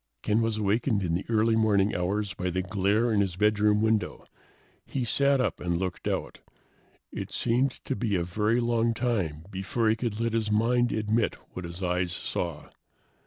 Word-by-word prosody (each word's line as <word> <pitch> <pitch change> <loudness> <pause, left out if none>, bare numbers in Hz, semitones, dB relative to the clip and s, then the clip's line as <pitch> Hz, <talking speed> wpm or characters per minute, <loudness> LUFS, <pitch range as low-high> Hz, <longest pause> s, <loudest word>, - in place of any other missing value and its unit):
Ken 110 +2 +2
was 115 -1 0
awakened 105 +1 +1
in 85 -2 -1
the 90 - -2
early 110 0 +3
morning 105 -2 +2
hours 100 +3 -1
by 90 0 -2
the 95 +1 -1
glare 100 +5 +1
in 100 - +3
his 95 -3 -1
bedroom 105 +1 +3
window. 110 -1 0 0.6
He 130 -3 -3
sat 140 +3 +3
up 115 -6 0
and 85 -1 -1
looked 90 0 -3
out. - - -3 0.7
It - - -6
seemed 125 +4 +1 0.2
to 135 - -1
be 110 -5 -1
a 90 - +1
very 105 +7 +1
long 115 -1 +1
time 90 -12 -1
before 100 +4 -1
he 110 - +3
could 115 -2 -3
let 115 -1 0
his 110 -2 0
mind 120 +3 +2
admit 110 +1 0 0.2
what 90 - -6
his 85 +3 -7
eyes 90 0 0
saw. 85 -2 -4
105 Hz, 180 wpm, -27 LUFS, 95-115 Hz, 0.7 s, early